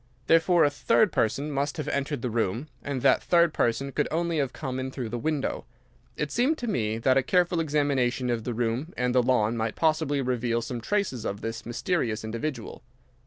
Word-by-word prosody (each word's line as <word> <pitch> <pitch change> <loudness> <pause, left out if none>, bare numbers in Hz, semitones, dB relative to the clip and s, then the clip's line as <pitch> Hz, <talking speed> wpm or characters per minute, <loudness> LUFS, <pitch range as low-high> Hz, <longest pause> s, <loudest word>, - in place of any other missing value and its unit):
Therefore 165 +1 +4
a 145 - +3
third 210 +7 +2
person 140 +7 0
must 140 0 -1
have - - -4
entered 140 -2 -2
the 125 - -1
room. 115 +5 -1
And 135 -2 -4
that - - +5
third 170 -2 +3
person 135 +4 0
could 150 - 0
only 170 0 0
have 135 -3 0
come 130 -3 -4
in 130 0 -3
through 130 -3 -5
the 120 +2 -3
window. 150 +1 -2 0.5
It 150 -1 -2
seemed 265 +7 +2
to 245 - -5
me 110 - 0
that 130 +3 +3
a - - +5
careful 175 +4 +2
examination 140 -5 +1
of 115 -2 -2
the 120 -1 -3
room 120 +8 -2
and 125 0 0
the 125 - +5
lawn 120 -2 +2
might 110 -1 -2
possibly 155 -3 +1
reveal 120 -2 0
some 120 0 -5
traces 195 - -1
of 100 0 -4
this 115 0 -5
mysterious 120 - -1
individual. 115 +2 -5
130 Hz, 200 wpm, -27 LUFS, 120-155 Hz, 0.5 s, that